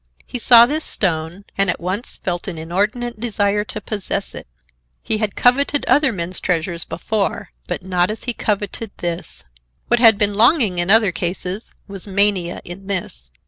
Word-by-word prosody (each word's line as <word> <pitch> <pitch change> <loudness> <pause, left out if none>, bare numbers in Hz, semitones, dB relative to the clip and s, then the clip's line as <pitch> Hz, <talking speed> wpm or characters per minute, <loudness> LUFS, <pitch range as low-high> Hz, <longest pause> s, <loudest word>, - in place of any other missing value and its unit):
He 250 - -6
saw 235 0 +8
this 305 +5 -2
stone, 170 +1 -2
and 195 -1 +3
at - - 0
once 185 +7 -2
felt 175 -1 -3
an 180 -4 -5
inordinate 210 +8 -2
desire 210 -3 0
to 215 - -6
possess 205 -2 -3
it. - - -9 0.6
He 215 - 0
had 215 -3 -2
coveted 280 +3 +2
other 290 -3 +3
men's 180 -2 -3
treasures 170 -1 -1
before, 200 +3 -3 0.2
but - - -4
not 180 -1 +1
as 215 - -4
he 245 - -1
coveted 210 0 -3
this. 170 -1 -3 0.5
What 240 - +3
had 225 -4 +7
been 205 -1 +2
longing 220 - +3
in 175 +1 0
other 215 -2 +6
cases 180 +4 -3
was 195 -1 -5
mania 195 -3 +2
in 190 +3 -9
this. 65 - -3
200 Hz, 170 wpm, -19 LUFS, 180-225 Hz, 0.6 s, saw